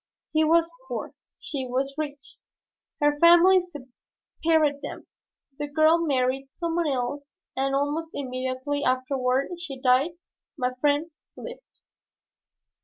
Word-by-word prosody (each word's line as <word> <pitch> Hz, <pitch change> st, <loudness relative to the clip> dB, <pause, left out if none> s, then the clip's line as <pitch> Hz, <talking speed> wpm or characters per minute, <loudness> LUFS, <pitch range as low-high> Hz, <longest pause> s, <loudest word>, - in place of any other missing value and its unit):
He 315 Hz, 0 st, +4 dB
was 335 Hz, +1 st, +3 dB, 0.2 s
poor, 240 Hz, -4 st, -5 dB, 0.2 s
she 265 Hz, -3 st, -4 dB
was 265 Hz, +2 st, -1 dB
rich. 285 Hz, -2 st, -6 dB, 0.6 s
Her 295 Hz, -1 st, +2 dB
family 345 Hz, +3 st, +7 dB
separated 300 Hz, 0 st, -2 dB
them. 285 Hz, -, -7 dB, 0.5 s
The 295 Hz, -, -2 dB
girl 315 Hz, +3 st, +4 dB
married 270 Hz, -4 st, 0 dB
some 335 Hz, +1 st, -3 dB
one 340 Hz, -2 st, +1 dB
else 280 Hz, +2 st, -3 dB, 0.2 s
and 270 Hz, +1 st, 0 dB
almost 295 Hz, +4 st, -1 dB
immediately 260 Hz, +2 st, -3 dB
afterward 255 Hz, +1 st, 0 dB
she 285 Hz, -6 st, -6 dB
died. 260 Hz, +5 st, +3 dB, 0.4 s
My 250 Hz, -2 st, -1 dB
friend 290 Hz, +5 st, 0 dB, 0.3 s
lived. -, -, -11 dB
285 Hz, 115 wpm, -26 LUFS, 260-320 Hz, 0.6 s, family